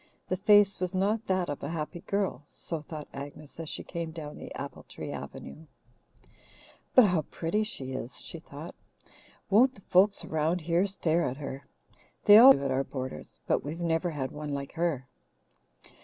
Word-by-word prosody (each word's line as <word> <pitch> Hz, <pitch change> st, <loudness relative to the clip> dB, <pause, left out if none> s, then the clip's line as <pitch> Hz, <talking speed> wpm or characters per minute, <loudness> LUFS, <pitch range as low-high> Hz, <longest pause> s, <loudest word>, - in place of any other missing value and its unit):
The 185 Hz, -, +1 dB
face 205 Hz, 0 st, +5 dB
was 185 Hz, +1 st, -2 dB
not 210 Hz, +4 st, 0 dB
that 185 Hz, -2 st, +1 dB
of 145 Hz, -, -4 dB
a 140 Hz, -, -4 dB
happy 165 Hz, +1 st, -4 dB
girl, 195 Hz, -4 st, -2 dB
so 165 Hz, -3 st, -5 dB
thought 150 Hz, 0 st, -8 dB
Agnes 145 Hz, +2 st, -9 dB
as 160 Hz, -2 st, -5 dB
she -, -, -5 dB
came 170 Hz, -2 st, -4 dB
down 155 Hz, -2 st, -7 dB
the -, -, -9 dB
apple -, -, -6 dB
tree -, -, -8 dB
avenue. 160 Hz, +1 st, -8 dB, 1.3 s
But 255 Hz, -, +9 dB
how 180 Hz, -5 st, +2 dB
pretty 175 Hz, +6 st, -1 dB
she 135 Hz, -11 st, -5 dB
is! 125 Hz, -1 st, -5 dB
she 165 Hz, -, -8 dB
thought. 155 Hz, +1 st, -9 dB, 0.8 s
Won't 255 Hz, +6 st, +5 dB
the -, -, -16 dB
folks 195 Hz, +3 st, +3 dB
around 160 Hz, +3 st, 0 dB
here 170 Hz, +4 st, +2 dB
stare 170 Hz, -4 st, +1 dB
at 130 Hz, -2 st, -2 dB
her! 140 Hz, -2 st, -7 dB, 0.6 s
They 205 Hz, +1 st, +10 dB
always 255 Hz, -, +10 dB
do 140 Hz, -, -4 dB
at 135 Hz, -, 0 dB
our 130 Hz, +1 st, +1 dB
boarders, 130 Hz, -, -7 dB
but -, -, +1 dB
we've 155 Hz, +4 st, -5 dB
never 170 Hz, 0 st, 0 dB
had 135 Hz, -5 st, -3 dB
one 150 Hz, -1 st, -4 dB
like 140 Hz, 0 st, -5 dB
her. 165 Hz, -7 st, -1 dB
165 Hz, 180 wpm, -29 LUFS, 145-185 Hz, 1.3 s, They